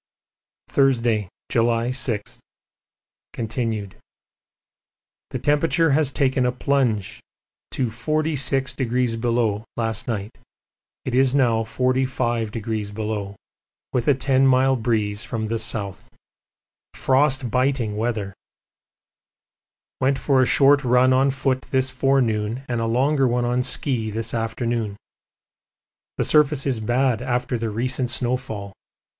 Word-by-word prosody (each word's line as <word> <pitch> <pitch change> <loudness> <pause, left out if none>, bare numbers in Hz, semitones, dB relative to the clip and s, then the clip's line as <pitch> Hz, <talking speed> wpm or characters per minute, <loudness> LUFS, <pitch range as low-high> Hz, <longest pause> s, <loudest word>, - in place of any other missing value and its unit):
Thursday, 120 -7 +1 0.2
July 115 +1 +1
6, 115 -5 -3 0.9
continued. 110 -4 -3 1.3
The - - -3
temperature 160 +2 +2
has 145 -1 +2
taken 130 -2 +1
a 125 - +2
plunge 125 -6 0 0.5
to 130 - -1
46° 125 -4 0
last 115 0 -2
night. 110 -1 -4 0.7
It 130 - -3
is 130 +1 +3
now 120 -5 +3
45°, 110 -5 -2 0.6
with 125 -2 0
a 145 - +5
ten 135 +1 +2
mile 130 0 +4
breeze 110 -3 -1
from 115 -3 -3
the 115 +1 -2
south. 105 -4 -3 0.9
Frostbiting 130 -4 +1
weather! 110 -3 -2 1.7
Went 135 +1 +2
for 135 0 +2
a 130 - +3
short 140 +1 +5
run 125 +1 +4
on 135 +2 +3
foot 130 -1 -1
this 130 -1 +1
forenoon 125 -3 0
and 120 -2 -2
a 115 - -1
longer 135 +4 +2
one 120 0 0
on 125 +1 +1
ski 125 -3 0
this 110 +1 -3
afternoon. 115 -2 -2 1.2
The - - 0
surface 150 -2 +3
is 130 -5 0
bad 120 +1 +1
after 125 0 -1
the 115 -1 -2
recent 125 +3 -1
snowfall. 120 -6 -3
125 Hz, 110 wpm, -22 LUFS, 115-130 Hz, 1.7 s, a